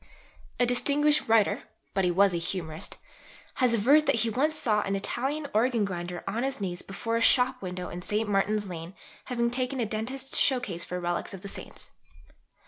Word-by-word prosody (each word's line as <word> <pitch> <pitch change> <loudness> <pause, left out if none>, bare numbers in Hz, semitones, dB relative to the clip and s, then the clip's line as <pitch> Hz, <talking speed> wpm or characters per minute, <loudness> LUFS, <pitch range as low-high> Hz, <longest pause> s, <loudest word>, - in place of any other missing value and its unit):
A 245 - +5
distinguished 290 +4 +3
writer 225 -2 +3 0.3
(but 195 - +1
he 180 - +3
was 195 +2 +4
a - - 0
humorist) 165 -2 -4 0.6
has 245 -2 +4
averred 280 +8 +4
that - - +4
he 230 0 +1
once 300 +7 +1
saw 210 -7 +2
an 195 -1 -1
Italian 270 +9 -2
organ 230 0 +2
grinder 175 -2 -5
on 215 +4 -2
his 270 -1 -1
knees 180 -3 -3
before 230 +4 -3
a - - -1
shop 255 +2 +4
window 180 -1 -5
in 175 - -6
St. 210 +4 -1
Martin's 205 +1 +1
Lane, 170 +1 -7 0.3
having 235 -2 0
taken 255 +1 -1
a 235 - +1
dentist's 250 +6 -2
showcase 245 -11 +1
for 180 - -4
relics 175 +2 -2
of 185 - -12
the - - -6
saints. - - -8
215 Hz, 185 wpm, -28 LUFS, 185-255 Hz, 0.6 s, A